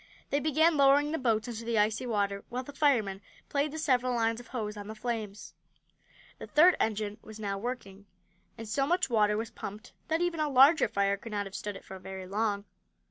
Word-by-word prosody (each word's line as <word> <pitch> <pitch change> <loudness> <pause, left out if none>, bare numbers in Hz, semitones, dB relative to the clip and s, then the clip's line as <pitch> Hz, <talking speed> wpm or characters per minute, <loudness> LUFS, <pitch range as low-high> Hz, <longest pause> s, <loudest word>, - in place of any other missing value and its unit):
They 285 - +2
began 315 +2 +3
lowering 285 +2 +5
the 320 - -1
boats 225 -4 +1
into 230 -1 -5
the 230 -1 -1
icy 215 +4 +1
water, 200 -3 -1
while 250 +1 -3
the 285 - -10
firemen 230 -10 +1 0.3
played 285 +1 0
the 315 - -6
several 255 -5 +1
lines 230 0 +1
of 240 - -12
hose 215 -4 -4
on 205 -1 -8
the 220 - -7
flames. 215 -3 -5 0.9
The - - -8
third 345 +4 +6
engine 215 -1 -1
was 220 0 -11
now 200 -2 -3
working, 205 -4 -6 0.5
and 225 - -7
so 275 +6 0
much 350 -4 +1
water 210 -2 +3
was 225 +1 -4
pumped 210 +2 -8
that 320 +1 +1
even 350 -2 -1
a 305 -1 +1
larger 275 +4 +6
fire 200 0 +1
could 215 +2 -9
not 205 -1 -1
have 195 - -9
stood 205 0 -5
it - - -11
for 190 - -9
very 190 0 -7
long. 205 +1 -1
225 Hz, 210 wpm, -30 LUFS, 205-275 Hz, 0.9 s, third